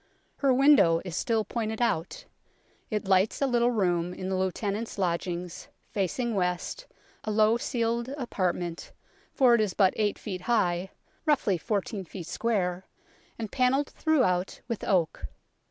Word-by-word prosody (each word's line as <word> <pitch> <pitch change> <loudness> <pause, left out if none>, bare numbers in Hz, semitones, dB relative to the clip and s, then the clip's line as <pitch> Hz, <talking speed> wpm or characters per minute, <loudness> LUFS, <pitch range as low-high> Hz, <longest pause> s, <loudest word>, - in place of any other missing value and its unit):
Her 275 -2 +2
window 260 - +5
is 175 -3 -5
still 220 +2 0
pointed 220 0 -3
out. 220 -8 -1 0.6
It 210 -2 -2
lights 190 +2 +3
a 280 - +2
little 240 -2 +2
room 180 -6 0
in 185 - -5
the 190 - 0
Lieutenant's 200 +4 -2
Lodgings, 175 -1 -2 0.2
facing 230 +4 -1
west, 185 - -2 0.4
a - - -4
low 215 +1 +4
ceiled 235 0 -1
apartment, 180 - -3 0.4
for 255 -4 +4
it 235 - +4
is 205 -4 -1
but 190 -3 +4
eight 210 -2 +1
feet 185 -3 -6
high, 185 -4 +1 0.4
roughly 260 -10 +3
fourteen 205 0 -2
feet 175 0 -8
square, 185 -2 -1 0.5
and 220 -3 -5
panelled 265 +2 +2
throughout 215 - +1
with 230 -3 -4
oak. 175 -5 0
210 Hz, 140 wpm, -28 LUFS, 180-235 Hz, 0.6 s, window